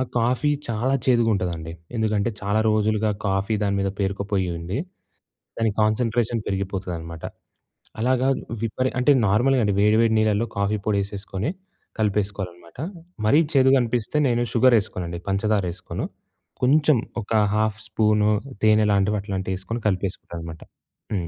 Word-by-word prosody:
ఆ - - +3 0.2
కాఫీ 125 +5 +1 0.2
చాలా 120 +4 0
చేదుగుంటదండి. 95 -9 +1 0.2
ఎందుకంటే 110 0 +1
చాలా 105 +2 +1
రోజులుగా 110 0 +1 0.2
కాఫీ 95 +2 0
దాని 100 -1 +1
మీద 100 - 0
పేరుకుపోయి 100 -1 -1
ఉండి, 90 +9 -4 0.8
దాని 115 -1 +2
కాన్సంట్రేషన్ 115 +1 +1
పెరిగిపోతదనమాట. 90 -4 -4 0.8
అలాగా 130 +2 +2 0.3
విపరి 130 +3 0
అంటే 125 +3 +4 0.2
నార్మల్‌గా 125 +6 +3
అండి 100 - +1
వేడి, 105 +2 +4
వేడి 115 -1 +3
నీళ్లలో 110 +1 +2
కాఫీ 100 +1 +1
పొడి 105 -2 +1
ఏసేసుకొని, 100 +4 -4 0.5
కలిపేసుకోవాలి 105 -3 -1
అనమాట. 85 +2 -19 0.5
మరీ 145 +9 +5
చేదుగ 135 0 +5
అనిపిస్తే 120 +3 -1
నేను 120 -1 +1
షుగర్ 125 0 +5
ఏసుకోనండి. 85 -4 -5
పంచదార 100 0 +1
ఏసుకోను. 90 - -5 0.6
కొంచెం 145 +1 +4 0.2
ఒక 105 - -13 0.2
హాఫ్ 110 0 +1
స్పూను 105 -1 +2 0.3
తేనె 110 0 +5
లాంటివి, 100 +1 +2
అట్లాంటివి, 95 -1 -3
ఏసుకొని 115 +5 -4
కలిపేసుకుంటానన్నమాట. 85 -4 -4 0.5
హ్మ్. 90 -4 -1
105 Hz, 130 wpm, -23 LUFS, 95-115 Hz, 0.8 s, మరీ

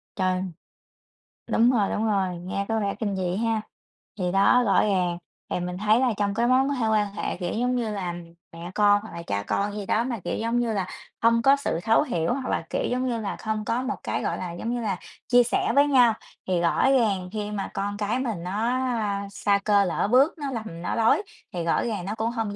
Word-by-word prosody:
Trời! 185 -1 0 1.1
Đúng 235 +2 +4
rồi, 215 -6 +2
đúng 220 - 0
rồi, 190 -4 0
nghe 185 +3 -4
có 225 0 0
vẻ 200 -1 -1
kinh 205 -3 -2
dị 180 -1 -1
ha. 225 0 0 0.6
Thì 180 -1 0
đó, 200 +6 +4
rõ 205 - +4
ràng, 180 -4 +1 0.3
thì - - -1
mình 180 0 -4
thấy 215 +3 +3
là 250 -3 +2
trong 200 -1 0
cái 235 +3 +1
mối 255 +1 +5
quan 265 -5 +1
quan 210 -2 +1
hệ, - - -3
kiểu 175 -1 -3
giống 250 +2 0
như 235 -3 -1
là, 185 -4 -3 0.4
mẹ 170 +2 -8
con, 205 -1 +4
hoặc 220 - -11
là 170 0 -6
cha 100 0 -1
con 200 - -1
gì 205 - -4
đó 220 +4 +1
mà, 240 -2 -3
kiểu 175 - -2
giống 230 +2 0
như 235 -2 0
là, 195 -3 -1 0.3
hông 230 0 +4
có 275 +4 +6
sự 280 -12 -2
thấu 225 0 +4
hiểu, 170 - -1
hoặc 265 0 -4
là, - - 0
kiểu - - -1
giống 255 +1 0
như 235 -2 -1
là, 200 - -3
không 215 -1 -3
có 235 +4 0
một 260 +1 -2
cái, - - -2
gọi - - -1
là, 180 -2 -5
giống 225 +7 -3
như 245 - -2
là, 200 -5 -1 0.3
chia 245 0 +6
sẻ 240 - 0
với 285 +1 +6
nhau, 250 -5 +5 0.3
thì 180 -2 +1
rõ 175 +10 +3
ràng 205 -8 +2
khi 210 -1 -3
mà 200 -2 -3
con 205 +1 -3
cái 210 +4 -1
mình 225 -10 -3
nó, 200 +5 -2
a, 215 -6 -1
sa 200 0 +1
cơ 205 -1 +4
lỡ 180 - 0
bước 270 +6 +5
nó 285 -3 -4
lầm 220 -9 -6
nó 180 - -2
lối, 225 - +3 0.3
thì 175 -2 -2
rõ 165 - +1
ràng 210 -6 -3
nó 205 +3 -3
cũng 225 +1 -1
hông 225 -4 -3
215 Hz, 240 wpm, -25 LUFS, 195-235 Hz, 1.1 s, có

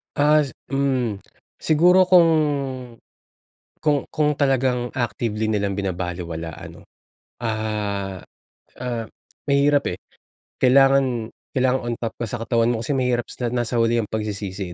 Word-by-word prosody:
As 150 -2 +3 0.2
hmm. 130 -7 0 0.4
Siguro 180 +4 +4
kung 180 -2 +6 1.6
kung 145 -2 +1
kung 150 -1 +1
talagang 130 -3 +1
actively 110 -3 -1
nilang 100 -2 0
binabalewala 90 -4 -4
ano, - - -12 0.6
ah, 105 -4 -3 0.5
ah, 120 -3 -4 0.4
mahirap 140 0 +3
eh. - - -17 0.6
Kailangan 130 -3 +4 0.2
kailangan 130 0 +2
on 120 - -1
top 115 -2 -3
ka 120 - -3
sa 110 - -5
katawan 115 +1 +2
mo 115 - -3
kasi 140 - -2
mahirap 125 -2 0
sa 120 -2 -3
nasa 120 -1 -1
huli 115 0 +2
ang 105 - -7
pagsisisi 100 -4 -4
120 Hz, 120 wpm, -22 LUFS, 105-135 Hz, 1.6 s, kung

